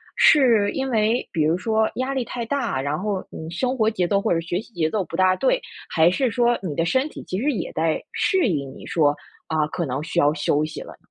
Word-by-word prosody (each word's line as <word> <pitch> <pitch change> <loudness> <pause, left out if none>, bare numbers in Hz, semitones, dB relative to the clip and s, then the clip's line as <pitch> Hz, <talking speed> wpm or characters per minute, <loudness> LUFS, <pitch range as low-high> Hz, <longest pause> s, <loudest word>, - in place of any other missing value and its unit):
是 230 -9 +5
因 270 0 -2
为 225 +1 +1
比 160 - 0
如 160 +3 +2
说 220 +2 +1
压 260 +2 -2
力 260 -3 -1
太 240 0 -4
大， 235 - -1
然 145 +3 -2
后 200 -1 -2
你 160 - -8
生 255 +9 -1
活 220 -2 +3
节 180 -5 0
奏 200 +2 +2
或 - - +1
者 165 - 0
学 175 +2 -2
习 225 +2 -12
节 160 -4 0
奏 205 +2 -1
不 - - -7
大 185 0 +4
对， - - +1 0.3
还 160 +1 +4
是 245 +7 0
说， 240 +2 +2
你 170 -6 -3
的 165 - +1
身 260 - +1
体 - - -10
其 185 - -2
实 285 +6 +1
也 240 - -4
在 160 0 0
适 380 -8 +2
应 140 -8 -2
你 - - -12
说， 145 -3 +2 0.3
啊， 155 -1 0
可 170 +2 -3
能 130 0 -3
需 170 - -1
要 145 -2 +4
休 150 0 +1
息 155 - -7
了 - - -10
呢。 - - -20
185 Hz, 270 characters per minute, -23 LUFS, 160-240 Hz, 0.3 s, 是